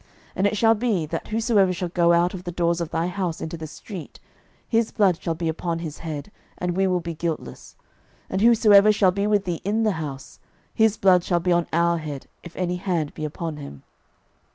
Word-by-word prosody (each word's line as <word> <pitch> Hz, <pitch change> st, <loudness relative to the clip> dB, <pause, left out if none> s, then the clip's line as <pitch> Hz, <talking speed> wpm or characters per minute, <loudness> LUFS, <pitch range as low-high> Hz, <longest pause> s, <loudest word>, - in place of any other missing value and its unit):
06:002:019 -, -, -30 dB, 0.3 s
And 195 Hz, +2 st, +3 dB
it 210 Hz, -, -1 dB
shall 225 Hz, +1 st, +5 dB
be, 210 Hz, -7 st, 0 dB
that 165 Hz, +2 st, -5 dB
whosoever 215 Hz, -4 st, +2 dB
shall 180 Hz, 0 st, -3 dB
go 170 Hz, -1 st, +3 dB
out 170 Hz, +1 st, +3 dB
of 185 Hz, -2 st, -7 dB
the 175 Hz, -, -5 dB
doors 170 Hz, 0 st, 0 dB
of 165 Hz, -, -3 dB
thy 165 Hz, 0 st, -1 dB
house 180 Hz, -2 st, -3 dB
into 160 Hz, +1 st, -5 dB
the 160 Hz, -1 st, -7 dB
street, 180 Hz, +2 st, -9 dB, 0.5 s
his 230 Hz, -1 st, +1 dB
blood 190 Hz, -6 st, +2 dB
shall 165 Hz, -, -2 dB
be 165 Hz, +1 st, -3 dB
upon 165 Hz, +1 st, -2 dB
his 160 Hz, -3 st, -6 dB
head, 160 Hz, +3 st, -6 dB, 0.3 s
and 175 Hz, -1 st, -2 dB
we 190 Hz, +1 st, +2 dB
will 180 Hz, -1 st, +1 dB
be 170 Hz, 0 st, -5 dB
guiltless: 165 Hz, 0 st, -5 dB, 0.5 s
and 190 Hz, -, -2 dB
whosoever 215 Hz, -3 st, +6 dB
shall 200 Hz, -3 st, +3 dB
be 200 Hz, +2 st, -1 dB
with 205 Hz, -2 st, +2 dB
thee 175 Hz, -3 st, -3 dB
in 215 Hz, +3 st, 0 dB
the 215 Hz, -, +3 dB
house, 135 Hz, -3 st, -7 dB, 0.3 s
his 220 Hz, -1 st, +3 dB
blood 185 Hz, -2 st, +4 dB
shall 175 Hz, -1 st, +1 dB
be 180 Hz, +1 st, 0 dB
on 170 Hz, -1 st, +2 dB
our 170 Hz, 0 st, +2 dB
head, 150 Hz, -3 st, -6 dB, 0.2 s
if 170 Hz, -, -12 dB
any 180 Hz, -1 st, -1 dB
hand 175 Hz, -5 st, -2 dB
be 155 Hz, -, -7 dB
upon 155 Hz, +1 st, -5 dB
him. 105 Hz, -, -10 dB
175 Hz, 220 wpm, -24 LUFS, 165-200 Hz, 0.5 s, whosoever